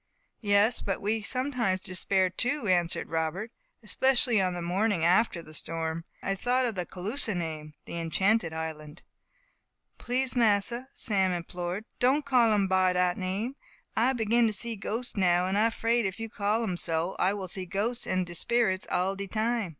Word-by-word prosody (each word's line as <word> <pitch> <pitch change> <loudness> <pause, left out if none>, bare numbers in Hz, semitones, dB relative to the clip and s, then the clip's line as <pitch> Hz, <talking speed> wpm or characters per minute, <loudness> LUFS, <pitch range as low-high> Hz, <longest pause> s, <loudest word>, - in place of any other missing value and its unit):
"Yes, 205 +2 +3
but 195 - -2
we 215 +2 -1
sometimes 250 -4 0
despaired, 185 0 0
too," 250 +1 -1
answered 175 -2 +1
Robert, 165 +7 -2 0.3
"especially 245 -5 +3
on 185 -1 0
the 175 - -4
morning 185 0 +1
after 180 -1 +3
the 155 - -13
storm. 165 +1 -3 0.2
I - - -3
have 195 -1 -2
thought 250 +1 +2
of 235 - -1
the 180 -3 -3
Caloosa 210 +3 -2
name 155 -3 -5
the 170 - -5
Enchanted 190 +3 +1
Island." 160 0 -6 1.0
"Please, 255 +1 0
Massa," 235 +2 +2
Sam 190 -4 +1
implored, 175 +3 -4
"don't 275 +4 +3
call 245 -5 +4
um 200 -2 +2
by 185 -1 +3
dat 180 0 +2
name. 200 +8 -3 0.4
I 245 +4 +3
begin 230 0 +2
to 215 - -1
see 230 +2 -2
ghosts 225 +4 -4
now; 180 -2 +3
and 190 +1 -1
I 220 +3 +4
'fraid, 230 -1 +1
if 190 +3 -6
you 225 0 -5
call 215 +1 0
um 185 -5 -2
so, 165 +2 -1
I 195 +2 +2
will 195 -2 -5
see 185 +1 -6
ghosts 215 +7 -2
and 185 -1 0
sperits 220 -1 +1
all 190 +2 +1
de 200 0 -5
time." 225 0 -1
195 Hz, 175 wpm, -28 LUFS, 180-230 Hz, 1.0 s, call